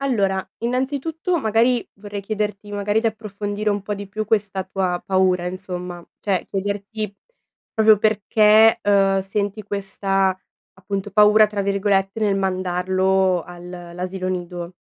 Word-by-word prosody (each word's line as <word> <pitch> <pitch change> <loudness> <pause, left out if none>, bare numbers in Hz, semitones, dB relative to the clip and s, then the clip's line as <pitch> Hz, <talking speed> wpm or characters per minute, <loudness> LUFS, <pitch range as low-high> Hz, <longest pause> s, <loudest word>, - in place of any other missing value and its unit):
Allora, 200 -8 0
innanzitutto, 285 - -1
magari, 230 0 +2
vorrei 205 0 -7
chiederti, 210 0 -3
magari, 205 +1 0
di 230 - 0
approfondire 210 -1 -2
un 205 0 0
po' 205 +1 -3
di 200 0 -7
più 215 +2 -4
questa 205 -3 0
tua 185 -2 -2
paura, 185 -2 +2
insomma, 180 -1 -6
cioè 195 -4 -1
chiederti, 205 +1 -3 0.6
proprio 220 -1 +5
perché, 215 +1 +5
uhm, 195 -1 +3
senti 200 +2 -2
questa, 195 -1 -1 0.4
appunto, 195 +1 -4
"paura", 210 +1 +6
tra 210 -1 -3
virgolette, 195 +1 0
nel 205 -2 +2
mandarlo 185 0 +1
al 175 +1 -11
l'asilo 180 +1 -5
nido. 175 -1 -4
200 Hz, 130 wpm, -22 LUFS, 190-215 Hz, 0.6 s, paura